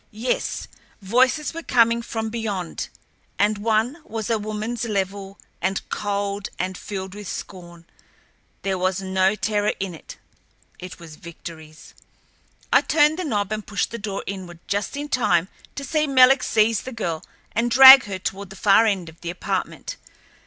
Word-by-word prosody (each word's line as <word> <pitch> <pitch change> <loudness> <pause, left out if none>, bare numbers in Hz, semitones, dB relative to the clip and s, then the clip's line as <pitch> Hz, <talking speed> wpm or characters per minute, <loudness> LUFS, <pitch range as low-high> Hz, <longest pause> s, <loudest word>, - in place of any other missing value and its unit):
Yes, 230 +4 -2 0.3
voices 255 +8 +2
were 330 - -5
coming 235 -5 +3
from 225 -1 -4
beyond 205 -7 -4 0.5
and 205 0 +2
one 225 +6 +1
was 225 -3 -4
a 225 - +1
womanl's, 215 +3 -3
level 195 -2 -3 0.2
and 190 +1 -2
cold 200 -1 -2
and 185 +1 -3
filled 190 -1 -6
with 205 -1 -8
scorn. 175 -3 -8 0.8
There 190 -1 -1
was 185 +1 0
no 190 +1 +1
terror 210 +1 0
in 195 -2 -3
it. 160 - -11 0.6
It 185 0 -9
was 160 -3 -12
Victoryl's. 160 -2 -11 0.8
I - - +7
turned 305 +2 +3
the - - -1
knob 205 - -1
and 215 0 -4
pushed 205 0 -2
the 235 - -5
door 200 -2 -4
inward 185 -3 -7
just 205 +7 -2
in 290 +1 -4
time 190 - +1 0.3
to 280 - -5
see 305 +2 0
Menelek 265 -1 +6
seize 220 0 +2
the 260 - -7
girl 170 -9 -3 0.3
and 235 +1 0
drag 265 +1 +10
her 200 -2 -4
toward 190 +1 -5
the 195 - -11
far 205 +3 +4
end 190 -5 -1
of 160 +1 -14
the 170 - -5
apartment. 185 - -4
205 Hz, 160 wpm, -23 LUFS, 190-230 Hz, 0.8 s, drag